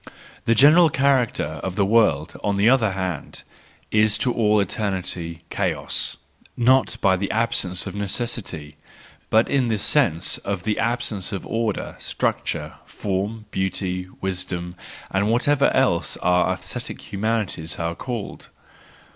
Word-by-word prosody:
The 115 - +3
general 155 +7 +7
character 130 - +1
of 95 -1 -4
the 100 -1 +2
world, 95 -8 +2
on 100 -1 0
the 100 +2 +3
other 115 -5 +4
hand, 95 -5 -4 0.5
is 105 0 +4
to 125 +1 0
all 105 -2 +3
eternity 90 -4 -3
chaos; - - -1 0.4
not 130 +2 +3
by 95 -1 +4
the 100 +1 -2
absence 105 -5 0
of 95 - -5
necessity, 100 -7 -4 0.5
but 110 +1 +4
in 135 -3 +1
the 110 -2 +1
sense 100 - +1
of 100 -3 -4
the 110 -1 -1
absence 115 -4 0
of 100 - -4
order, 115 -2 -2
structure, - - -2
form, 105 +3 -3
beauty, 90 -1 -2
wisdom, 90 -2 -3 0.4
and 100 +2 +1
whatever 140 +4 +3
else 130 -11 +1
our 90 0 +2
aesthetic - - -6
humanities 100 -6 -2
are 85 0 -2
called. 115 +3 -6
100 Hz, 130 wpm, -23 LUFS, 90-115 Hz, 0.5 s, general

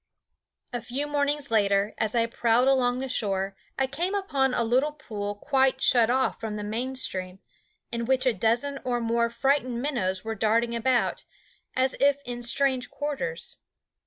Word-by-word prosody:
A 245 - -2
few 265 +6 -3
mornings 290 -2 -1
later, 200 -1 +2
as 220 +1 0
I 230 -1 +3
prowled 235 +2 +2
along 250 -2 +3
the 265 - -3
shore, 195 -5 -1 0.2
I 270 - +2
came 340 +9 -2
upon 280 -10 +1
a 235 - +2
little 260 +6 +2
pool 205 -8 -5
quite 265 +4 +2
shut 235 -3 +4
off 260 +1 +1
from 220 -2 -4
the 210 - -4
main 240 +5 -3
stream, 185 -7 -3 0.5
in 235 0 -2
which 260 +1 +1
a 255 - +3
dozen 235 +7 0
or 245 -2 0
more 235 0 +1
frightened 255 0 0
minnows 210 -9 -1
were 225 - -2
darting 230 +2 +1
about, 245 +1 +1 0.5
as 260 +1 +2
if 285 0 +3
in 240 0 -5
strange 260 +1 +1
quarters. 275 - -4
245 Hz, 165 wpm, -26 LUFS, 225-270 Hz, 0.5 s, shut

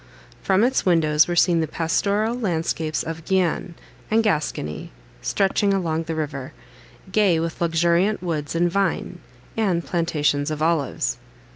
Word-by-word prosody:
From 195 +2 +2
its 260 +2 +2
windows 155 -4 +3
were 175 - -1
seen 170 -1 +4
the 160 - -1
pastoral 200 +8 0
landscapes 165 -8 -1
of 160 0 -6
Guienne 180 -1 0 0.3
and 225 +1 +3
Gascony 150 - -2 0.3
stretching 195 - +1
along 165 -3 -1
the 165 0 -3
river, 145 -4 -4 0.6
gay 190 -5 +3
with 165 +1 -4
luxuriant 170 +4 +2
woods 155 -3 -3
and 175 +1 +2
vine, 200 +1 -1 0.4
and 185 -7 0
plantations 150 -4 0
of 155 -1 -3
olives. 160 -2 0
170 Hz, 135 wpm, -23 LUFS, 160-190 Hz, 0.6 s, seen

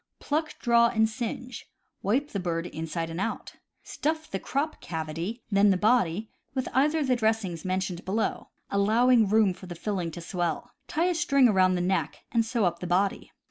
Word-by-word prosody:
— - - -55
Pluck, 310 +2 -2
draw, 235 -1 +4
and 220 -1 +2
singe. 240 +1 -6 0.3
Wipe 265 +9 0
the 200 - -2
bird 170 -2 -2
inside 165 0 -4
and 165 +3 -4
out. 225 - -4 0.3
Stuff 315 +1 -3
the 195 - -2
crop 290 +8 -2
cavity, 165 +8 -4
then 200 +1 +5
the 190 - +3
body, 215 -2 +2 0.2
with 260 -1 -1
either 295 +5 +3
of 305 - +1
the 255 - +3
dressings 220 -7 0
mentioned 185 -1 -2
below, 215 +4 -2 0.2
allowing 220 +2 +4
room 215 -3 +4
for 185 +1 -12
the 175 - -7
filling 180 -1 -2
to 165 - -8
swell. 170 -2 -3 0.2
Tie 325 +3 0
a 360 - +2
string 280 -6 +4
around 185 -4 +4
the 180 - 0
neck, 185 +2 -1
and 230 -1 +3
sew 225 -2 0
up 170 -1 0
the 180 - -5
body. 190 +3 0
210 Hz, 190 wpm, -27 LUFS, 180-245 Hz, 0.3 s, then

